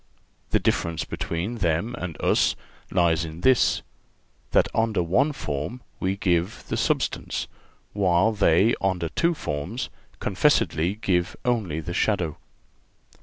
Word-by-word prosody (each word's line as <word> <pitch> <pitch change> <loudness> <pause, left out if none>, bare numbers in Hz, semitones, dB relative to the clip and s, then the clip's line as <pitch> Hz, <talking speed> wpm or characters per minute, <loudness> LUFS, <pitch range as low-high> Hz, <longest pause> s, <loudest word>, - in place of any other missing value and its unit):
The - - +3
difference 85 -1 0
between 95 +8 -3
them 85 +6 0
and 90 -8 -6
us - - +3 0.3
lies 85 -3 +2
in 80 +1 -7
this—that 130 +4 0
under 110 -5 +1
one 95 - +2
form 75 - -4 0.2
we 95 +1 0
give 90 -2 0
the - - 0
substance, - - -1 0.5
while 95 +1 +3
they 100 +1 +4
under 90 -4 0
two 170 - +1
forms 85 - -4 0.3
confessedly 85 +6 +2
give 95 -5 0
only 105 -11 0
the 90 +3 -5
shadow. 90 -6 0
90 Hz, 120 wpm, -25 LUFS, 85-110 Hz, 0.5 s, they